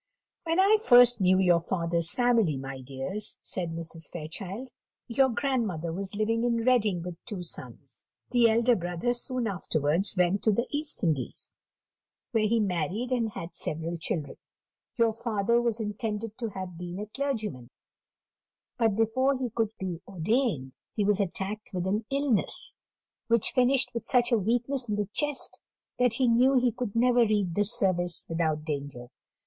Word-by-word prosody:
"When 330 +2 +1
I 400 +3 +6
first 245 - +7
knew 185 0 +5
your 180 -3 +4
father's 170 -2 -1
family, 230 - +2
my 135 0 -6
dears," 140 +11 -3
said 175 -3 -4
Mrs. 165 -1 -7
Fairchild, 190 +9 -7 0.4
"your 265 +3 +3
grandmother 225 - -1
was 195 +2 -5
living 225 +2 0
in 235 -1 +1
Reading 215 -9 +2
with 175 -1 -8
two 200 -6 -5
sons: 170 - -9 0.2
the 240 -2 +5
elder 235 +2 +4
brother 180 +6 -1
soon 250 0 -3
afterwards 175 -2 0
went 180 +2 +2
to 220 - +4
the 235 +4 +1
East 295 -4 -1
Indies, 150 -8 -1 0.8
where 215 -1 +2
he 230 +2 +2
married 195 - -1
and 230 -4 0
had 165 - -7
several 165 +2 -2
children. 155 -3 -3 0.6
Your 230 -2 +3
father 230 0 +1
was 235 -1 -1
intended 215 0 -3
to 230 -2 -2
have 185 -3 -7
been 175 0 -6
a 210 - -4
clergyman, 215 - -3 1.1
but 225 -4 +3
before 260 +5 +2
he 250 -3 -3
could 225 -1 0
be 180 -3 -4
ordained 190 - 0 0.2
he 210 - +1
was 205 0 +2
attacked 200 +2 -3
with 180 0 -1
an 210 +4 -1
illness, 275 -6 0 0.5
which 230 -2 +2
finished 255 0 +3
with 235 - -5
such 245 0 +3
a 235 - +5
weakness 245 +4 0
in 210 - +1
the 205 -2 -2
chest, 295 -2 -1 0.4
that 250 -2 +3
he 255 0 +2
knew 250 +4 +4
he 250 -1 +3
could 235 -2 -5
never 245 +1 +4
read 210 -6 +2
the 205 - +2
Service 185 -6 +1
without 160 -2 -1
danger. 140 -5 -5
210 Hz, 160 wpm, -28 LUFS, 175-240 Hz, 1.1 s, first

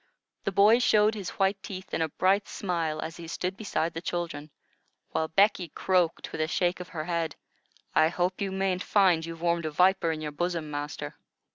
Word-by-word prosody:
The 195 - +1
boy 210 +5 +6
showed 215 -3 +4
his 200 -4 -5
white 195 -1 +1
teeth 190 -1 -8
in - - 0
a 160 - +1
bright 195 +6 +2
smile 165 -5 -2
as 165 +1 -6
he 170 -1 -8
stood 180 +3 -3
beside 170 -6 -2
the 165 - -5
children, 170 -4 -4 0.6
while 160 - 0
Becky 195 0 +3
croaked, 180 0 0
with - - -3
a 155 - +1
shake 175 +2 0
of 180 0 -8
the 155 -2 -4
head: 165 -3 -1 0.6
"I 155 - +5
hope 180 +3 -1
you 195 -1 -1
mayn't 190 -1 0
find 185 -6 +3
you've 165 0 -7
warmed 170 -1 +1
a - - -1
viper 180 +2 +3
in 160 - -3
your 155 -1 -4
bosom, 165 0 -2
master." 145 0 -5
175 Hz, 200 wpm, -28 LUFS, 160-190 Hz, 0.6 s, boy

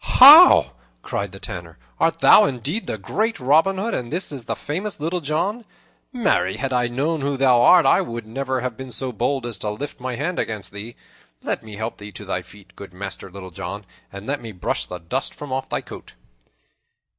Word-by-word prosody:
"How!" - - +9 0.3
cried 100 -2 -4
the 95 - -11
Tanner, 85 -4 -8 0.2
"art 165 0 +1
thou 210 - +7
indeed 145 - -2
the - - -3
great 210 - -2
Robin 160 +9 +3
Hood, 220 +5 -2
and 120 0 -4
is 175 +5 -2
this 140 -5 -5
the - - -2
famous 185 +7 -4
Little 170 +4 -2
John? 185 +10 -2 0.5
Marry, 195 - 0
had 135 -1 -3
I 125 -1 +2
known 145 +6 -1
who 140 0 -1
thou 130 -3 +4
art, 175 +7 +6
I 135 - +4
would 115 -1 -6
never 130 +3 -3
have 125 -2 -3
been 130 +1 -8
so 125 +2 -3
bold 130 +3 -1
as 115 -5 -4
to 105 - -3
lift 125 +8 -6
my 125 0 -4
hand 170 +8 -3
against 105 -3 -3
thee. 105 +4 -8 0.5
Let - - -2
me 110 -2 -10
help 110 +2 -5
thee 105 0 -9
to 105 - -8
thy 95 -2 -2
feet, 95 +3 -18
good 95 -3 -11
Master 95 0 -6
Little 95 0 -10
John, 95 +4 -7 0.3
and 100 +1 -9
let 145 +3 -3
me 115 -2 -8
brush 90 - -2
the 90 - -6
dust 90 +11 -4
from 145 -3 -7
off 135 0 -3
thy - - -2
coat." - - -12
125 Hz, 210 wpm, -22 LUFS, 105-145 Hz, 0.5 s, How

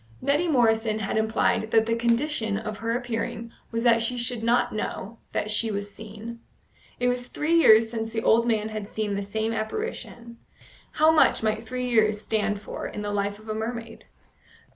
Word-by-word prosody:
Neddy 290 +6 +1
Morrison 225 -6 +2
had 215 -2 -3
implied 220 0 +1
that 225 0 +4
the 230 - 0
condition 235 -2 0
of 215 -1 -5
her 230 +1 0
appearing 230 -1 -4 0.2
was 230 0 -2
that 230 -1 +5
she 245 +2 0
should 240 -1 0
not 235 +2 +2
know 215 +1 -5
that 210 - -1
she 225 +2 +1
was 205 -1 -4
seen. 220 +2 -9 0.6
It 245 - +1
was 245 0 -1
three 310 +3 -1
years 225 -8 +6
since 225 -1 -3
the 225 0 -2
old 230 +1 +4
man 220 -2 +1
had 215 -1 -6
seen 215 -2 -2
the 200 - -2
same 220 +3 -2
apparition; 235 - -5 0.5
how 310 +1 +5
much 320 - +4
might 220 +1 -1
three 250 +1 -3
years 215 -3 +3
stand 210 -1 -1
for 210 - -6
in 210 - -6
the 205 - -3
life 200 0 -1
of 215 +1 -16
a 215 - -2
mermaid? 225 +1 -5
225 Hz, 185 wpm, -25 LUFS, 215-235 Hz, 0.6 s, years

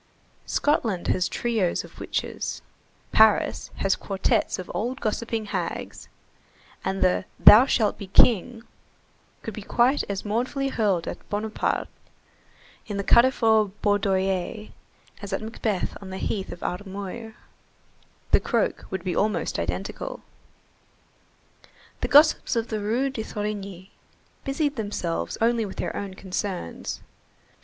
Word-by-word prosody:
Scotland 225 - 0
has 185 0 +1
trios 220 -7 0
of - - -14
witches, - - -3 0.5
Paris 220 -1 +4
has 195 - +1
quartettes 200 +3 0
of 185 - -7
old 250 +5 -2
gossiping 225 -1 -2
hags; - - -4 0.7
and 190 0 -1
the 185 0 +2
"Thou 240 +6 +9
shalt 220 -6 +1
be 200 - -7
King" 225 +3 +4 0.8
could 225 - -5
be 215 - -7
quite 245 +7 +2
as 200 0 -3
mournfully 255 +6 -1
hurled 200 -9 0
at - - -7
Bonaparte 210 +1 -1 1.0
in 205 - -4
the 200 - -1
Carrefour 225 -2 +5 0.2
Baudoyer 195 0 0 0.5
as 200 -1 -6
at 195 - -2
Macbeth 220 -3 -2
on 195 - -9
the 190 - -5
heath 195 0 -3
of - - -9
Armuyr. 200 +4 -5 1.0
The - - +6
croak - - -1
would 190 -2 -4
be 185 -2 -2
almost 200 - 0
identical. 90 +3 -4 1.8
The - - -1
gossips 300 -1 +5
of 230 0 -1
the 215 - -2
Rue 235 +7 0
de 240 - -4
Thorigny 200 -3 -5 0.5
busied 285 0 -1
themselves 205 -6 -3
only 230 0 +3
with 200 - -6
their - - -3
own 195 -2 -5
concerns. 190 - -4
210 Hz, 125 wpm, -25 LUFS, 190-230 Hz, 1.8 s, Thou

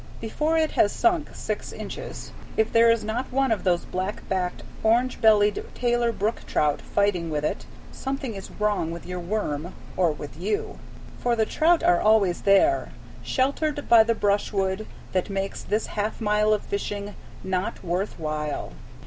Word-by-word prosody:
Before 305 +8 0
it 315 -1 +2
has 205 - +3
sunk 345 -4 +1
six - - -4
inches, - - -7 0.3
if 220 - +2
there 230 0 +6
is 230 -1 +3
not 230 +5 -3
one 270 -1 +2
of 220 - 0
those 175 -2 +1
black 190 +3 -4
backed, 180 -2 -2 0.2
orange 240 +3 +2
bellied, 210 -2 +4
Taylor 240 -1 +1
Brook 220 +1 -2
trout 150 -1 +1
fighting 195 -5 0
with 150 -1 -1
it, - - -3 0.2
something 270 -3 -4
is 195 -1 -8
wrong 210 -6 0
with 170 +1 -7
your 180 0 -4
worm 175 -4 -3 0.2
or 175 -3 +3
with 150 -1 -8
you. 205 +5 -2 0.4
For 240 -1 +1
the 220 -1 +2
trout 330 +8 +3
are 175 - +4
always 210 -5 +3
there, 265 - +3 0.3
sheltered 290 +2 0
by 235 -1 +8
the 230 +1 +2
brushwood 200 -1 0 0.2
that 185 +1 0
makes 195 0 -3
this 215 +2 -1
half 210 +1 -3
mile 210 -1 +2
of 210 - +1
fishing 205 0 -4 0.3
"not 185 +1 -2
worth 180 +3 -2
while." 150 -2 -3
210 Hz, 165 wpm, -25 LUFS, 185-230 Hz, 0.4 s, by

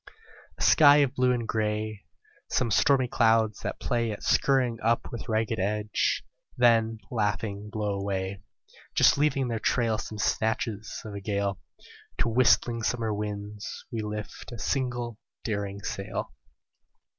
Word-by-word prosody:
A - - -3
sky 145 -2 +7
of 135 -2 -1
blue 125 -2 +2
and 120 -2 -1
grey; 110 -1 -2 0.4
Some 120 -3 0
stormy 130 +3 +4
clouds 115 -2 +2
that - - -4
play 120 -3 0
At 105 - -7
scurrying 125 -4 +2
up 115 +1 +1
with 115 -1 -7
ragged 110 0 0
edge, 105 +2 0 0.3
then 115 -2 +4
laughing 105 -2 -2
blow 105 -2 -2
away, 95 -1 -3 0.5
Just - - +5
leaving 145 -2 +2
in - - -1
their 115 -1 -2
trail 115 -1 +1
Some 110 - -6
snatches 110 +1 -1
of 105 - -7
a 100 - -6
gale; 100 -1 -1 0.6
To 120 - +1
whistling 120 0 +3
summer 115 -1 -1
winds 105 0 -5
we 115 - -2
lift 105 +3 -6
a 120 - -7
single 120 -3 -2 0.2
daring 100 -2 -3
sail. 100 0 -4
110 Hz, 145 wpm, -27 LUFS, 105-120 Hz, 0.6 s, sky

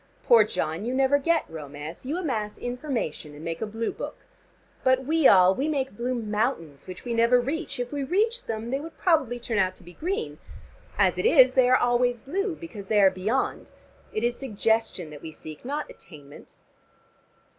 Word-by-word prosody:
Poor 230 -3 +7
John, 165 -4 -3
you 245 +3 -2
never 270 +2 +3
get 330 +3 +1
romance. 150 - -8
You 305 +5 -1
amass 225 - -2
information, 245 - -4
and 150 - -10
make 165 0 -4
a 220 - -1
Blue 225 +2 -3
Book. - - -6 0.7
But 260 0 +3
we 315 0 +4
all, 185 -1 +7
we 270 +8 -1
make 270 -7 -1
blue 245 +3 -2
mountains, 210 - -2
which 185 +5 -9
we 240 - -2
never 235 +2 +4
reach. 290 +4 -3
If 245 0 -3
we 285 -1 -2
reached 440 - 0
them 225 +1 -4
they 270 - 0
would 320 +2 -9
probably 300 -9 +2
turn 230 -3 -1
out 185 -1 +1
to - - -14
be 175 - -13
green. 390 - -3 0.6
As - - +3
it - - -1
is, 260 - +6
they 255 -1 +4
are 255 - +6
always 245 0 +2
blue, 365 - -2
because 230 - -9
they 210 0 +3
are 195 -2 +6
beyond. 215 +8 -2 0.4
It 215 - -2
is 240 0 +1
suggestion 220 - -1
that 150 - -10
we 160 - -7
seek, 155 0 -11
not 290 +4 -3
attainment. 145 -4 -13
240 Hz, 190 wpm, -26 LUFS, 195-275 Hz, 0.7 s, Poor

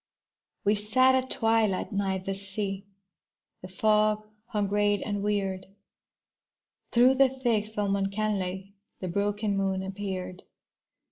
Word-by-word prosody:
We 205 - +4
sat 255 +6 +3
at 260 0 +1
twilight 225 -4 +1
nigh 195 -2 0
the 190 +1 -4
sea, 195 0 -4 0.7
The 185 - -8
fog 215 +2 +2 0.2
hung 210 -3 -1
gray 205 0 +2
and 205 -1 -2
weird. 195 -2 -1 1.2
Through 250 +2 +6
the 265 0 +5
thick 230 -5 -1
film 200 -1 +1
uncannily 195 -1 -2 0.3
The 185 - -4
broken 205 +2 0
moon 190 -1 0
appeared. 190 -1 -5
205 Hz, 120 wpm, -28 LUFS, 195-215 Hz, 1.2 s, Through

